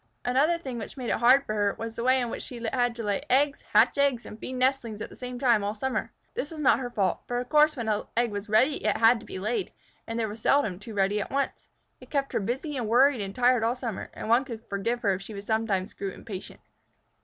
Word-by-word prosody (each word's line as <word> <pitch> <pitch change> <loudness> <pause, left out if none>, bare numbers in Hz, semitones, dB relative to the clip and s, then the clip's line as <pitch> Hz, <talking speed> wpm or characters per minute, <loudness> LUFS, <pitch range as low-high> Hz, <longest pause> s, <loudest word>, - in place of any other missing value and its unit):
Another 280 +7 +3
thing 260 -8 -6
which 220 - -8
made 250 -3 -4
it - - +1
hard 255 +4 +5
for 215 - -3
her, 205 -1 +1
was 225 0 -5
the 235 - -3
way 260 +1 +4
in 240 -2 -2
which - - -5
she 245 - -8
had 245 -2 +1
to 230 - -5
lay 205 -2 0
eggs, 280 +2 +3
hatch 225 +6 +4
eggs, 275 -4 +2
and 215 - -10
feed 255 - -6
nestlings 255 -4 0
at - - -6
the - - -11
same 250 -1 -6
time 240 -5 +3
all 205 +1 -2
summer. 265 +4 -2 0.2
This 290 - -3
was 320 - -8
not 275 -4 +4
her 250 -2 -4
fault, 200 -5 0
for 245 - -2
of 245 0 -3
course 305 0 +5
when 235 -2 -3
an 210 -1 0
egg 240 -1 +2
was 205 +1 -5
ready 260 +8 +3
it 215 - +1
had 230 +1 +5
to - - -14
be - - -6
laid, 215 - -2 0.4
and 225 +1 -3
there 225 - 0
were 210 - -6
seldom 220 -5 +1
two 215 +1 -9
ready 200 +1 +1
at - - -5
once. 280 0 -2 0.3
It - - -15
kept 275 -2 -1
her - - +2
busy 265 +8 -3
and 240 -4 -2
worried 250 +2 +4
and 195 0 -5
tired 250 -2 +3
all 230 +2 +1
summer, 235 -5 -5
and - - -6
one 235 +4 +4
could 235 -4 -8
forgive 230 +5 -2
her 200 -2 +3
if 190 - -4
she 200 +1 -7
sometimes 205 -2 -1
grew 195 - -4
impatient. 195 -1 -9
235 Hz, 260 wpm, -27 LUFS, 215-260 Hz, 0.4 s, hard